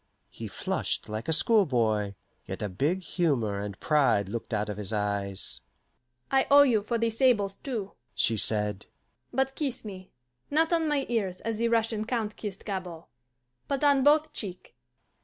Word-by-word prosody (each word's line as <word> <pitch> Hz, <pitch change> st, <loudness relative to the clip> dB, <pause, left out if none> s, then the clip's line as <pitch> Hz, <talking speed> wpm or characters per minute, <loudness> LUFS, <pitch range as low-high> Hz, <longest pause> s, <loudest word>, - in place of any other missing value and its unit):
He -, -, -7 dB
flushed -, -, -2 dB
like 110 Hz, +2 st, -4 dB
a -, -, +1 dB
schoolboy, 120 Hz, -, +2 dB, 0.3 s
yet -, -, -5 dB
a 105 Hz, -, -2 dB
big 150 Hz, -, 0 dB
humour 130 Hz, -, 0 dB
and 100 Hz, -1 st, -6 dB
pride 135 Hz, -10 st, +2 dB
looked 115 Hz, +3 st, -5 dB
out 105 Hz, -1 st, 0 dB
of 105 Hz, -1 st, -4 dB
his 105 Hz, 0 st, -3 dB
eyes. 100 Hz, -2 st, -2 dB, 0.7 s
"I 270 Hz, 0 st, +3 dB
owe 285 Hz, 0 st, +9 dB
you 235 Hz, -6 st, +3 dB
for 230 Hz, +3 st, -1 dB
the 230 Hz, 0 st, +1 dB
sables, 220 Hz, -5 st, +2 dB
too," 225 Hz, -8 st, -4 dB, 0.2 s
she 115 Hz, -, +2 dB
said. 105 Hz, -1 st, 0 dB, 0.4 s
"But 265 Hz, 0 st, 0 dB
kiss 270 Hz, -6 st, -3 dB
me 190 Hz, -3 st, -8 dB, 0.4 s
not 320 Hz, +3 st, +2 dB
on 325 Hz, -2 st, +2 dB
my 290 Hz, -2 st, +1 dB
ears, 200 Hz, -6 st, -1 dB
as 225 Hz, -1 st, -3 dB
the 235 Hz, -, +2 dB
Russian 225 Hz, -2 st, +1 dB
count 220 Hz, -3 st, -2 dB
kissed 200 Hz, -3 st, -7 dB
Gabord, 180 Hz, -5 st, -5 dB, 0.6 s
but 275 Hz, 0 st, -1 dB
on 285 Hz, -2 st, +5 dB
both 300 Hz, +2 st, +4 dB
cheek." 185 Hz, -4 st, -6 dB
195 Hz, 165 wpm, -28 LUFS, -, 0.7 s, owe